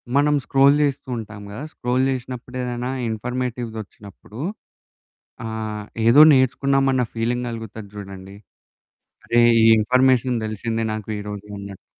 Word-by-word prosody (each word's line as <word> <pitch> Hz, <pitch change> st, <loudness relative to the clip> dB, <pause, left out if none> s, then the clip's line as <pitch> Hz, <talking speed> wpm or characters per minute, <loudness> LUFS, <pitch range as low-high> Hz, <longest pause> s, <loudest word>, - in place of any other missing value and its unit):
మనం 150 Hz, +1 st, +4 dB
స్క్రోల్ 135 Hz, +1 st, +5 dB
చేస్తూ 140 Hz, -1 st, -2 dB
ఉంటాం 105 Hz, -2 st, -8 dB
గదా! 110 Hz, +8 st, -7 dB
స్క్రోల్ 125 Hz, +2 st, 0 dB
చేసినప్పుడు 125 Hz, -1 st, -6 dB
ఏదైనా 125 Hz, 0 st, -3 dB, 0.2 s
ఇన్ఫర్మేటివ్‌ది 120 Hz, 0 st, -4 dB
వచ్చినప్పుడు 105 Hz, +3 st, -14 dB, 1.1 s
ఆహ్, 110 Hz, -2 st, -5 dB, 0.2 s
ఏదో 130 Hz, +6 st, +7 dB
నేర్చుకున్నామన్న 135 Hz, 0 st, +2 dB
ఫీలింగ్ 120 Hz, +2 st, -1 dB
కలుగుతది 110 Hz, -2 st, -7 dB
చూడండి. 95 Hz, -1 st, -9 dB, 0.9 s
"అరే! 120 Hz, -, +2 dB, 0.2 s
ఈ -, -, +4 dB
ఇన్ఫర్మేషన్ 125 Hz, +2 st, +3 dB
తెలిసిందే 115 Hz, +1 st, -3 dB
నాకు 110 Hz, 0 st, -6 dB
ఈరోజు 105 Hz, 0 st, -7 dB
అన్నట్టు." 100 Hz, -1 st, -10 dB
120 Hz, 115 wpm, -22 LUFS, 105-130 Hz, 1.1 s, ఏదో